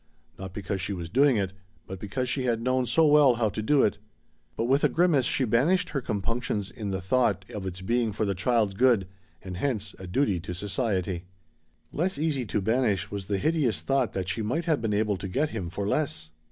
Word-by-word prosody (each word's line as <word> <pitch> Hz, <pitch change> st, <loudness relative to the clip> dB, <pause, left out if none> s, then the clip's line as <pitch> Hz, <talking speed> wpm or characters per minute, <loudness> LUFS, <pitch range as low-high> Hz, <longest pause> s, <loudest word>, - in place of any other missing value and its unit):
Not 95 Hz, -1 st, -6 dB
because 100 Hz, 0 st, -4 dB
she 100 Hz, -, -2 dB
was 85 Hz, -3 st, -6 dB
doing 135 Hz, 0 st, +4 dB
it, 95 Hz, -2 st, -1 dB, 0.3 s
but 95 Hz, -1 st, -7 dB
because 125 Hz, +6 st, -3 dB
she 130 Hz, +1 st, -1 dB
had 115 Hz, -2 st, +1 dB
known 130 Hz, +1 st, 0 dB
so 165 Hz, +5 st, +4 dB
well 145 Hz, -4 st, +6 dB
how 115 Hz, -2 st, +1 dB
to 110 Hz, -, -4 dB
do 140 Hz, +6 st, +3 dB
it. 100 Hz, -1 st, +1 dB, 0.6 s
But -, -, 0 dB
with 135 Hz, +4 st, +2 dB
a -, -, +5 dB
grimace 160 Hz, -7 st, +3 dB
she 130 Hz, -, +1 dB
banished 165 Hz, -, +2 dB
her 140 Hz, -, -2 dB
compunctions 110 Hz, -1 st, -2 dB
in 105 Hz, -3 st, -5 dB
the 95 Hz, 0 st, -2 dB
thought 100 Hz, -1 st, +1 dB
of 100 Hz, -2 st, -4 dB
its 95 Hz, 0 st, -6 dB
being 115 Hz, +3 st, +1 dB
for 105 Hz, +1 st, -1 dB
the 100 Hz, -, 0 dB
child's 105 Hz, +1 st, +1 dB
good, 115 Hz, -3 st, +3 dB, 0.4 s
and 90 Hz, -2 st, -6 dB
hence 105 Hz, -5 st, -2 dB
a 95 Hz, -, -8 dB
duty 100 Hz, -2 st, +1 dB
to 90 Hz, +1 st, -6 dB
society. 95 Hz, -3 st, -2 dB, 0.7 s
Less 185 Hz, +5 st, -1 dB
easy 145 Hz, -5 st, -1 dB
to 105 Hz, -, -1 dB
banish 110 Hz, -1 st, +1 dB
was 100 Hz, -2 st, -5 dB
the 100 Hz, -, 0 dB
hideous 150 Hz, -, +1 dB
thought 135 Hz, -3 st, 0 dB
that 95 Hz, -2 st, -3 dB
she 90 Hz, +5 st, -2 dB
might 130 Hz, +11 st, -1 dB
have 155 Hz, -7 st, +1 dB
been 110 Hz, -2 st, -1 dB
able 105 Hz, -1 st, +1 dB
to 95 Hz, -, -5 dB
get 145 Hz, +11 st, 0 dB
him 85 Hz, -3 st, -4 dB
for 100 Hz, +3 st, -3 dB
less! 90 Hz, -, -1 dB
110 Hz, 220 wpm, -27 LUFS, 95-130 Hz, 0.7 s, well